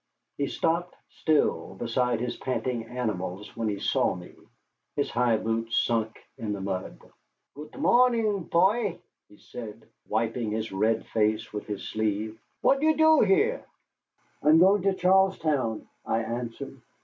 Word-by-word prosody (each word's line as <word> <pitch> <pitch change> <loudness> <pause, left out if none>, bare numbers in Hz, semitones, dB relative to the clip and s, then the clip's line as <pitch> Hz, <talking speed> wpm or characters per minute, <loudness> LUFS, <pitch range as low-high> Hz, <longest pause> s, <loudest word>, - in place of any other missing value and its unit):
He 140 - +1
stopped 170 +4 -1
still 150 -10 0
beside 120 +2 0
his 125 - -2
panting 125 -2 -2
animals 105 -5 -4
when 115 -1 -2
he 105 -1 -1
saw - - +1
me, 90 0 -11 0.6
his - - -1
high 120 -2 +2
boots 115 +1 -1
sunk 110 -2 0 0.2
in 110 -3 -2
the 100 - -5
mud. 95 -10 -4 0.6
"Gut 150 - -10
morning, 230 - +3
poy," 195 +3 +2 0.3
he 105 - -18
said, 110 -2 -10 0.2
wiping 115 +1 -1
his 110 +1 -3
red 110 +4 +1
face 110 0 0
with 105 - -5
his 105 -2 -5
sleeve; 110 +1 -2 0.2
"what 275 +1 +3
you 315 0 +3
do 315 0 +6
here?" 430 +6 +2 0.8
"I 150 - +2
am 155 - +7
going 190 +4 +5
to 195 0 +1
Charlestown," 180 - +2 0.2
I 115 +1 0
answered. 120 +3 -6
120 Hz, 145 wpm, -27 LUFS, 110-175 Hz, 0.8 s, am